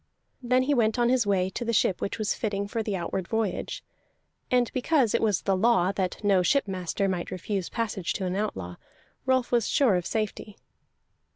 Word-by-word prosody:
Then 255 +1 +2
he 290 +3 +1
went 225 -4 +2
on 240 0 +3
his 250 -4 +2
way 190 -2 +1
to 240 - -4
the 230 - -1
ship 195 -4 +2
which - - -2
was 215 -2 0
fitting 200 -2 -2
for 225 +2 -2
the 210 -2 -2
outward 180 0 -3
voyage; 220 -3 -2 0.7
and 245 -2 +2
because 255 -2 +2
it - - +2
was 210 -5 +1
the 195 - +2
law 190 -3 +3
that 190 0 -3
no 200 -3 +4
shipmaster 195 -4 0
might 180 -2 -2
refuse 185 0 -3
passage 210 -6 -2
to 190 - -3
an 180 0 -2
outlaw, 95 - -3 0.5
Rolf 260 -1 +2
was 235 -3 +2
sure 265 -8 +3
of 180 0 -3
safety. 215 -1 -3
205 Hz, 190 wpm, -27 LUFS, 190-235 Hz, 0.7 s, no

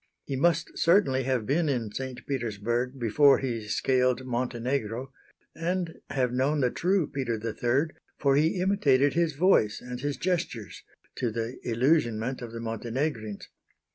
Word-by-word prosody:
He 140 - -3
must 165 +3 +1
certainly 165 -8 +3
have 130 -4 0
been 155 +5 +1
in 120 -6 -1
St. 130 +2 -6
Petersburg 120 0 -2
before 135 +4 +5
he 115 -5 -3
scaled 130 +3 +1
Montenegro; 125 0 -2 0.4
and 175 0 -2
have 125 -3 0
known 140 +4 +1
the 125 -2 +2
true 185 -1 +1
Peter 130 -5 -2
III, 120 +7 0 0.3
for 140 -2 +3
he 160 +5 +2
imitated 145 -8 +3
his 170 -2 +1
voice 145 - +3
and 125 0 -7
his 145 0 -2
gestures 165 - -2 0.4
to 125 - 0
the 115 +2 -4
illusionment 120 -1 +1
of 120 -2 -7
the 115 - -6
Montenegrins. 115 0 -3
130 Hz, 140 wpm, -28 LUFS, 115-150 Hz, 0.4 s, before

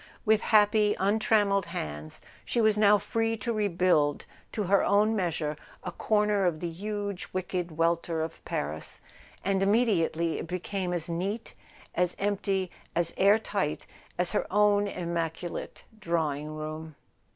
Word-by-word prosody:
With 220 -1 +4
happy 210 -1 +4
untrammelled 205 0 +2
hands 75 +1 -6 0.2
she - - -1
was 220 -2 +4
now 210 0 +6
free 225 +2 -1
to 230 +2 -2
rebuild 180 -8 +2 0.3
to 210 - -2
her 195 +1 +3
own 210 +2 +3
measure 165 -6 -1 0.3
a - - -4
corner 210 -3 +2
of 160 -3 -1
the 170 0 -3
huge 200 +1 -4
wicked 180 -3 -3
welter 165 0 +1
of 165 0 -7
Paris; 75 +2 -3 0.5
and 195 0 +1
immediately 195 -6 +2
it - - -5
became 180 +1 -3
as 175 -3 -1
neat, 190 +7 -3 0.4
as 180 0 0
empty, 195 -2 -1 0.2
as 170 -1 +1
air 200 +2 +5
tight 195 -8 -2 0.3
as 180 0 +1
her - - 0
own 205 0 +4
immaculate 170 -2 -4 0.2
drawing¬ 160 -6 -1
room. 155 0 -6
190 Hz, 140 wpm, -28 LUFS, 165-210 Hz, 0.5 s, now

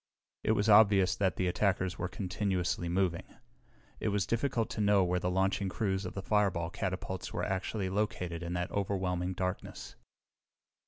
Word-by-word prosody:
It 110 - +3
was 105 0 +1
obvious 100 -3 +6
that 95 -4 +1
the 95 - -1
attackers 95 0 0
were 90 - -1
continuously 90 -2 -2
moving. 90 -1 -1 0.6
It - - -2
was 100 -3 +1
difficult 115 0 0
to 110 - -2
know 100 -2 +4
where 90 0 +1
the 90 - -1
launching 95 +1 +1
crews 95 -1 -1
of - - -8
the 95 - -4
fireball 95 -6 +1
catapults 95 -1 -4
were - - -3
actually 95 +1 -2
located 90 -4 -2
in 85 0 -4
that 90 0 -2
overwhelming 95 -2 -1
darkness. 90 +1 -4
95 Hz, 160 wpm, -31 LUFS, 90-100 Hz, 0.6 s, obvious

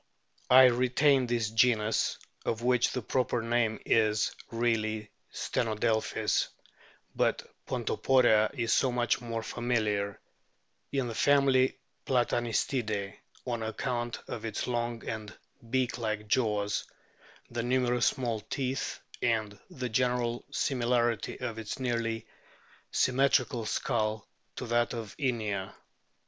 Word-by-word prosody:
I 130 +1 +9
retain 130 +2 +4
this 115 -2 0
genus 110 -1 +2 0.3
(of 115 +1 -2
which 125 -1 +3
the 125 - -3
proper 125 -1 0
name 115 -2 +1
is 110 -1 +3 0.2
really 110 -2 -1 0.2
Stenodelpkis, 110 -1 0 0.7
but - - +1 0.2
Pontoporia 120 -5 +3
is 115 -4 +1
so 130 - +3
much 120 0 +1
more 115 -1 -4
familiar) 110 -5 -1 0.7
in 135 -3 0
the 115 - -4
family 135 -1 +3 0.3
Platanistidae 120 -4 0 0.3
on 120 -3 -2
account 120 +2 -2
of 115 - -5
its 115 - -3
long 120 -1 -2
and 110 -1 -5 0.3
beak 130 0 0
like 110 -2 -2
jaws, 105 -3 +1 0.7
the 120 0 -2
numerous 125 0 +2
small 120 -4 -1
teeth, 130 +3 -3 0.2
and 110 -3 0
the 125 -1 -4
general 120 0 0
similarity 120 -3 0
of 120 -3 -4
its 110 -2 -5
nearly 115 -3 -1 0.6
symmetrical 130 -3 +2
skull 110 -2 -1 0.3
to - - -5
that 120 0 +1
of 110 -3 -6
Inia. 110 -8 -2
120 Hz, 110 wpm, -30 LUFS, 110-125 Hz, 0.7 s, I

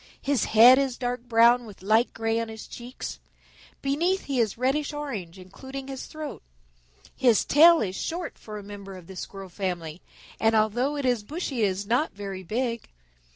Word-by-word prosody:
His 275 -4 +1
head 240 +4 +8
is 270 -3 -1
dark 245 -1 -3
brown 235 +1 +5
with 200 -3 -13
light 220 +4 +3
gray 225 0 -1
on 230 -1 -3
his 220 0 -8
cheeks. 245 +2 -8 0.6
Beneath 335 +8 +1
he 275 -3 -2
is 220 -3 +1
reddish 275 +4 0
orange, 220 - -5
including 265 +9 -9
his 270 -1 -6
throat. 310 -1 -7 0.7
His 245 -5 +3
tail 330 +3 +7
is 190 -3 -2
short 335 -1 -4
for 215 -1 -8
a 205 - -8
member 200 -1 -9
of 180 - -13
the 190 - -11
Squirrel 195 +1 -7
family, 175 -3 -4 0.4
and 225 0 +3
although 240 +7 +1
it 285 - -2
is 245 -3 +2
bushy, 280 - -4
it 210 - +4
is 195 +1 -3
not 245 +9 +1
very 195 -2 -6
big. 230 +4 -3
235 Hz, 180 wpm, -26 LUFS, 205-270 Hz, 0.7 s, head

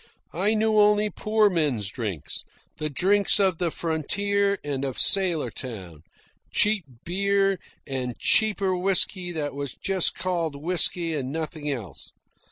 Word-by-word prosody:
I 200 +6 +2
knew 215 0 +3
only 210 0 +4
poor 215 +2 +2
men's 145 - 0
drinks, 105 - -4 0.4
the 155 - -2
drinks 200 +8 +3
of 190 -4 +2
the 175 - +1
frontier 200 +6 0
and 140 -2 -3
of 135 -3 -3
sailor 180 -6 +2
town 95 - -8 0.5
cheap 210 -4 +2 0.2
beer 195 +1 +1 0.3
and 125 -3 -4
cheaper 200 -4 +2
whisky 180 0 +1
that 150 -3 -3
was 140 -2 -5
just 190 -2 0
called 170 -4 -2
whisky 165 +2 0
and 135 -3 -3
nothing 155 -1 -4
else. 110 - -6
175 Hz, 135 wpm, -25 LUFS, 140-200 Hz, 0.5 s, only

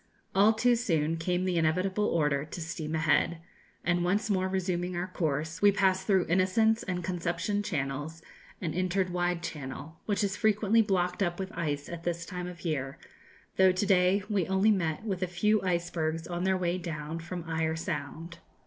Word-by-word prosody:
All 205 +3 +6
too 240 +2 +3
soon 165 -9 0
came 180 +2 0
the 180 -2 +1
inevitable 185 +6 +1
order 150 -6 +1
to 155 +3 -8
steam 160 -1 -4
ahead; 160 +2 +2 0.5
and 175 0 +1
once 205 +5 +1
more 185 -1 +1
resuming 180 -1 -1
our 175 +1 -1
course, 160 -2 -2
we 205 0 +7
passed 190 -1 +1
through 190 -4 +3
Innocents 220 +6 +3
and 180 -2 -3
Conception 175 +3 -1
Channels, 150 -3 -3 0.4
and 165 -3 -3
entered 185 +1 0
Wide 175 -1 -1
Channel, 145 +2 -6
which 205 0 +1
is 195 -1 0
frequently 215 0 +3
blocked 180 -3 0
up 175 -2 0
with 190 -1 -4
ice 145 -3 -2
at 170 -1 -7
this 170 -1 -2
time 180 -1 -5
of 180 0 -9
year, 135 -4 -2 0.6
though 190 0 +6
to 185 +3 0
day 190 +1 +3
we 200 -6 0
only 190 +3 +3
met 165 -3 0
with 195 -4 -3
a 185 - +1
few 210 +5 +2
icebergs 170 -3 -1
on 175 +1 -3
their 190 0 +2
way 180 0 -1
down 160 -2 -5
from 170 0 -6
Eyre 160 0 0
Sound. 165 +1 -5
180 Hz, 180 wpm, -29 LUFS, 165-190 Hz, 0.6 s, we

